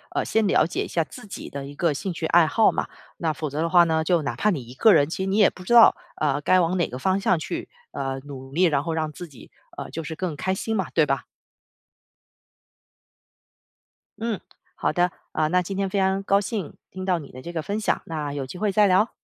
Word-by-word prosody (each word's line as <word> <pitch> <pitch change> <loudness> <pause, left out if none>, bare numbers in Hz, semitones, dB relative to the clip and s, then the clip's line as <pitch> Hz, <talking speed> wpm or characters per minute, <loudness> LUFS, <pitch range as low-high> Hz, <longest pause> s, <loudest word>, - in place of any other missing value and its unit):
呃， - - +1
先 220 -1 +1
了 175 - +4
解 170 - -2
一 - - -6
下 165 - 0
自 240 +8 -12
己 - - -8
的 140 -1 -6
一 140 +1 -10
个 165 0 +1
兴 185 +7 -4
趣 165 - -4
爱 170 0 +5
好 220 +6 +4
嘛。 - - -2 0.3
那 160 -2 -1
否 150 +1 -4
则 145 +2 -4
的 165 - 0
话 175 0 +6
呢， 160 -1 +1
就 170 +1 +2
哪 135 -4 -3
怕 205 - +1
你 160 -11 -1
一 120 - -11
个 215 - +5
人， 145 +1 +4
其 175 - -4
实 - - -2
你 195 - +1
也 205 - +6
不 185 - -13
知 210 - -1
道， 235 -1 +8 0.3
呃， 145 -2 +1
该 185 +6 +4
往 175 +1 +1
哪 175 - +1
个 125 - -6
方 190 +8 +1
向 185 -3 +2
去， 155 - -5 0.2
呃， 135 -1 -3
努 135 -2 -9
力， 175 +5 +2
然 150 -6 +3
后 165 +1 -2
让 155 -1 -2
自 175 +4 -9
己， 140 -6 -16 0.3
呃， - - -6
就 165 - -5
是 160 - -5
更 175 -2 -3
开 190 +4 -1
心 225 +3 -3
嘛， 190 -4 -1
对 160 - +4
吧？ 135 -1 -1 3.0
嗯， 225 -4 -2 0.4
好 - - 0
的， 175 +3 +1 0.2
呃， 155 0 +1
那 180 +2 +3
今 190 +2 -5
天 195 -1 0
非 200 - -2
常 190 0 +2
高 200 +1 +3
兴 200 -4 -4 0.2
听 185 0 -6
到 180 -3 +1
你 145 - -11
的 130 - -10
这 170 +5 -8
个 165 - -2
分 200 +6 -3
享， 215 - 0
那 150 -3 -4
有 140 -2 -3
机 130 - -9
会 210 +1 0
再 210 +1 +4
聊。 190 +5 +3
170 Hz, 270 characters per minute, -24 LUFS, 150-190 Hz, 3.0 s, 道